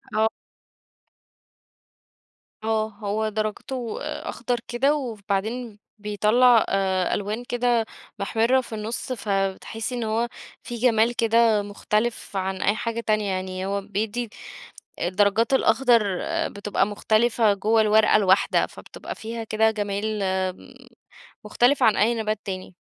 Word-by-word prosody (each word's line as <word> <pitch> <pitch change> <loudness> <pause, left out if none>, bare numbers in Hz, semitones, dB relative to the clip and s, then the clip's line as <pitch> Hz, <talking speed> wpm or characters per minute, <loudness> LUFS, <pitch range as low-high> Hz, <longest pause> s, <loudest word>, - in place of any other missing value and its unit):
آه. 220 +1 +4 2.4
آه، 220 0 +1
هو 215 0 -2
درَجته 215 +3 -4
أخضر 240 +1 -3
كده 270 +5 +2
وبعدين 220 -2 -3 0.2
بيطلّع 215 +3 +4
آآ 190 -2 +1
ألوان 210 +4 -3
كده 240 -2 +1 0.3
محمِرّة 230 +6 +2
في 235 -3 -8
النُّص، 220 +4 -4
ف 225 -3 -7 0.3
تحسّي 225 +3 -5
إن 240 - -2
هو 225 +2 0 0.4
فيi - - -5
جمال 235 0 +2
كده 230 -2 +3
مختلف 210 +2 -2
عن 190 0 -2
أي 205 - +2
حاجة 230 0 -3
تانية، 215 -3 0
يعني 185 0 -3
هو 200 +1 -1
بيدّي 215 +4 -3 0.7
الدرجات 200 +6 +2
الأخضر 240 -2 +4 0.5
بتبقى 205 0 -1
مختلفة 215 +1 +2
جوَّه 215 +3 +2
الورقة 215 0 +5
الواحدة، 195 -2 +3
فبتبقى - - -9
فيها 225 +1 -6
كده 220 0 +2
جمال، 210 0 -2 0.3
م 260 - -16 0.7
مختلفة 245 +6 +3
عن 215 - +4
أي 235 +3 +3
نبات 215 -2 -1
تاني. 185 -2 -6
220 Hz, 120 wpm, -24 LUFS, 205-235 Hz, 2.4 s, الورقة